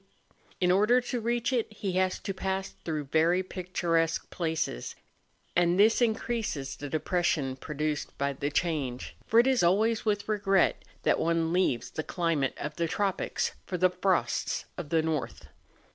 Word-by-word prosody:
In 180 -1 +3
order 210 +7 +5
to 245 0 -3
reach 235 +2 0
it 235 -3 0
he 200 -2 -3
has 185 0 +1
to 195 - -3
pass 190 0 -2
through 155 -3 -4
very 165 +6 +2
picturesque 170 -3 -1
places; 160 - -2 0.6
and 175 0 +3
this 220 +4 +5
increases 220 - -1
the 145 0 -7
depression 155 -3 0
produced 150 +2 -3
by 140 0 0
the 140 +2 -2
change; 145 -6 -2
for 225 - +5
it 240 - +6
is 260 -2 +3
always 215 +6 +3
with 205 -2 0
regret 200 -3 +2 0.2
that - - +3
one 165 0 +1
leaves 175 -10 +1
the - - -3
climate 165 -5 -1
of 150 +1 -5
the 170 - 0
tropics 195 +2 -1 0.2
for 180 - -2
the 185 +1 +3
frosts 180 0 0
of 170 -5 -6
the 160 -1 +2
north. 155 -4 -3
175 Hz, 160 wpm, -29 LUFS, 155-200 Hz, 0.6 s, it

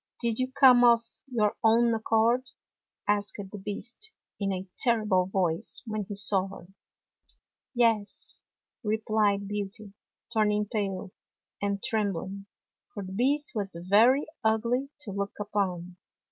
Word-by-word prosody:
" - - -57
Did 235 -1 0
you 255 0 0
come 260 -3 +7
of 235 -1 +6 0.2
your 220 -5 +1
own 230 +1 +5
accord? 225 +3 +2 0.3
" - - -64 0.3
asked 205 0 +1
the 210 - -7
Beast, 245 - -4 0.3
in 200 -1 0
a 190 0 -4
terrible 215 -7 +2
voice, 185 +1 -1
when 215 -2 -3
he 205 - -6
saw 195 -1 +2
her. 195 -2 -11 0.6
" - - -30
Yes," 225 -4 +1 0.4
replied 210 -2 +1
Beauty, 205 0 -4 0.4
turning 210 -1 +2
pale, 195 -4 -3 0.5
and 200 -1 -1
trembling, 200 -3 -2 0.4
for 205 - -6
the 190 0 -7
Beast 280 +7 +1
was 200 -6 -3
very 220 - +4 0.2
ugly 235 +5 +1
to 220 - -4
look 200 +1 -3
upon. 185 -4 -2
210 Hz, 135 wpm, -28 LUFS, 200-235 Hz, 0.6 s, come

